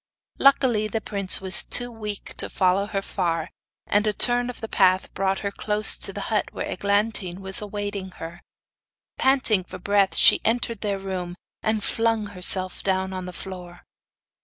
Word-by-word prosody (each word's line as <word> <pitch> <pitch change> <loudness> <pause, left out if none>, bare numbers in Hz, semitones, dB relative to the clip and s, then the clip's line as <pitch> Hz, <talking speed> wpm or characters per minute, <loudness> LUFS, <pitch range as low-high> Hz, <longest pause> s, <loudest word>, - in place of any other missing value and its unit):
Luckily, 255 -6 +3
the 220 +1 -3
prince 200 -3 +5
was 190 -1 +2
too 245 0 0
weak 210 -3 -7
to - - -4
follow 190 +2 +1
her 195 -2 -3
far, 165 -5 -2 0.3
and 205 +1 +1
a 210 - +1
turn 245 +2 +3
of 245 - -9
a - - -3
path 185 -3 +2
brought 195 0 -1
her 200 - -3
close 210 +1 0
to - - -1
the - - -6
hut, - - +1
where - - -5
Eglantine 200 -3 -1
was 190 +1 -3
awaiting 205 -2 -5
her. 170 +2 -9 0.8
Panting 260 -7 +3
for 185 +1 -10
breath, 200 +1 +1
she - - +6
entered 230 -1 -1
their 205 -2 -2
room, 185 -2 -5 0.3
and 215 -1 -1
flung 225 -1 0
herself 185 0 +2
down 190 0 -1
on 185 -1 -6
the - - -6
floor. 180 -2 -10
200 Hz, 170 wpm, -23 LUFS, 185-215 Hz, 0.8 s, she